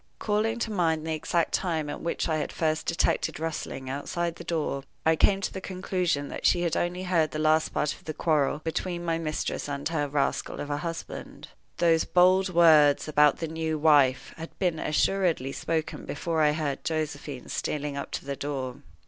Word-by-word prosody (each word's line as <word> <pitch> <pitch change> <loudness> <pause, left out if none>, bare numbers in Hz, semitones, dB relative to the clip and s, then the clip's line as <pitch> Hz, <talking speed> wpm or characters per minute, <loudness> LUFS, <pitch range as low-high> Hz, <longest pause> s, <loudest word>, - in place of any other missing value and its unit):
Calling 215 +2 0
to 225 -1 -2
mind 165 -5 +1
the 160 - -1
exact 165 +2 0
time 160 -5 0
at 145 - -5
which 170 - -1
I 160 -1 +1
had 150 - -3
first 155 -1 -1
detected 170 - +1
the 160 - -6
rustling 150 -4 -4
outside 165 +5 -3
the - - -8
door, 160 -4 -2 0.2
I 160 0 +5
came 195 +4 +3
to - - -3
the 190 - -5
conclusion 180 -6 -1
that - - -7
she 175 - +3
had 170 - 0
only 180 +1 -1
heard 170 -4 +2
the 155 - -5
last 155 +1 +3
part 150 - -1
of - - -17
the 155 - -4
quarrel 150 -2 +1
between 175 +1 -3
my 165 -1 0
mistress 155 -2 -3
and 140 0 -2
her 155 -3 0
rascal 140 -1 -1
of 145 - -4
a 145 - 0
husband. 165 +1 -6 0.3
Those 165 -2 +3
bold 185 +2 +4
words 155 -5 +5
about 150 -1 +4
the 165 - -3
"new 160 0 -2
wife" 140 -4 +4
had 165 0 -9
been 175 -5 0
assuredly 165 -4 +1
spoken 160 +2 -3
before 160 +2 -1
I 150 -1 +4
heard 150 -3 -2
Josephine 150 -4 -3
stealing 145 -1 -2
up 140 - -4
to - - -4
the 140 0 -3
door. 135 -3 -4
160 Hz, 195 wpm, -27 LUFS, 145-170 Hz, 0.3 s, I